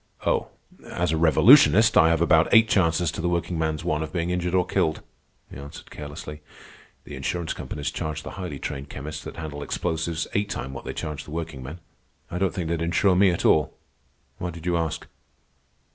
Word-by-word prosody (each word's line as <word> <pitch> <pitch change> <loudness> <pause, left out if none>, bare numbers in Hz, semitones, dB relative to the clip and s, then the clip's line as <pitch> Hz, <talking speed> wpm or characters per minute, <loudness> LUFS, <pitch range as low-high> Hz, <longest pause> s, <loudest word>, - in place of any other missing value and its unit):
"Oh, - - +1 0.4
as 90 -1 -1
a - - +1
revolutionist, 105 - +6
I 80 - +6
have 85 0 +2
about 80 -1 +4
eight 115 -1 +7
chances 85 -4 +2
to 80 - -5
the 85 - 0
workingman's 80 -2 -1
one 75 -3 0
of 80 -1 -4
being 85 0 -2
injured 90 0 -1
or 90 -1 +3
killed," 80 - 0 0.5
he - - -9
answered 70 +2 -11
carelessly. 75 +1 -8 0.6
"The - - -9
insurance 85 -2 -3
companies 70 - -5
charge 75 0 -4
the - - -7
highly 90 -7 -6
trained 70 +1 -6
chemists 75 +3 -7
that - - -7
handle 75 -3 -6
explosives 80 +2 -2
eight 100 0 0
times 65 -7 -5
what 65 - -8
they - - -4
charge 75 -2 -5
the - - -13
workingmen. 80 -1 -6 0.5
I 90 - -3
don't 95 -2 +1
think 85 -2 -4
they'd 85 0 -1
insure 85 +3 +2
me 95 +1 +5
at 85 - -1
all. 75 -2 +3 0.6
Why 90 - -3
did 85 -1 -9
you 90 -1 +1
ask?" 80 -2 -2
80 Hz, 190 wpm, -25 LUFS, 75-90 Hz, 0.6 s, eight